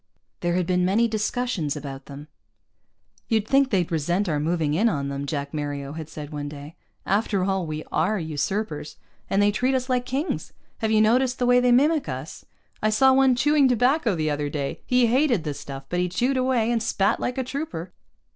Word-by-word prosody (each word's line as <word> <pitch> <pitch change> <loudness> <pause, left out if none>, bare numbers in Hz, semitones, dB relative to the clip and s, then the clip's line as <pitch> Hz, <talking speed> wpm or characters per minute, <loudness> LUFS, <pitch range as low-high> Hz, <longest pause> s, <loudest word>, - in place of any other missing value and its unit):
There 175 0 0
had 180 -1 +1
been 180 0 +1
many 205 +6 +3
discussions 215 - -1
about 135 -2 -7
them. 145 +1 -10 1.0
"You'd 220 -2 +1
think 275 +1 +3
they'd 180 -7 0
resent 175 +5 0
our 150 -3 0
moving 155 -1 0
in 215 +9 +3
on 140 -7 -2
them," 140 0 -4
Jack 140 0 -4
Mario 145 -2 -4
had 160 -1 -7
said 150 -1 -8
one 145 -1 -4
day. 145 +2 -10 0.3
"After 200 -1 +1
all, 190 -2 -1
we 155 0 -4
are 210 +7 +1
usurpers. 160 0 -3 0.3
And 195 +1 +3
they 205 - +4
treat 255 +5 +1
us 255 0 -2
like 250 -1 0
kings. 275 +7 -3 0.3
Have 220 - 0
you 215 0 +4
noticed 250 +4 +3
the 250 - 0
way 245 0 +5
they 250 0 +3
mimic 290 - +3
us? 130 +3 -7 0.4
I 215 - +2
saw 265 +5 +5
one 265 -1 +4
chewing 295 +2 +4
tobacco 250 - +2
the 155 -2 -1
other 145 0 -2
day. 140 -2 -4
He 250 -1 +4
hated 245 - +2
the 150 -3 -3
stuff, 140 -1 -8
but 175 - -2
he 180 0 0
chewed 245 +9 0
away, 255 -3 +1
and 235 -1 +1
spat 200 -3 +1
like 250 +2 -3
a 260 - 0
trooper." 240 - -5
195 Hz, 205 wpm, -24 LUFS, 150-245 Hz, 1.0 s, way